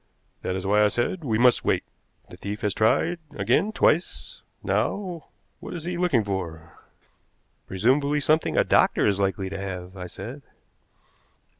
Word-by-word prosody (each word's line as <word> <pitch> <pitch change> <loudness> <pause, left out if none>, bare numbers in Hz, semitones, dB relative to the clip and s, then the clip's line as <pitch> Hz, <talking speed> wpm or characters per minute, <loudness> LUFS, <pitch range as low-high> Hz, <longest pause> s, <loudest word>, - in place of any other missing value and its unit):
That 90 - -2
is 95 +1 -4
why 105 +2 +4
I - - +6
said 120 - -1
we 115 -6 0
must 125 +1 +4
wait. - - +1 0.4
The - - -12
thief 105 +3 -6
has 105 -4 0
tried 165 - +2 0.2
again 210 - +2
twice. 200 - 0 0.2
Now, 180 -5 -1 0.3
what - - -7
is 165 - -6
he 175 +1 -3
looking 175 -10 +2
for?" 85 -5 -5 0.9
"Presumably 135 +9 +2
something 155 +2 +1
a - - +5
doctor - - +3
is 100 -2 +2
likely 95 -1 -1
to 100 - -5
have," 95 -1 -6
I 90 -1 -6
said. 120 +11 -8
110 Hz, 155 wpm, -25 LUFS, 95-155 Hz, 0.9 s, I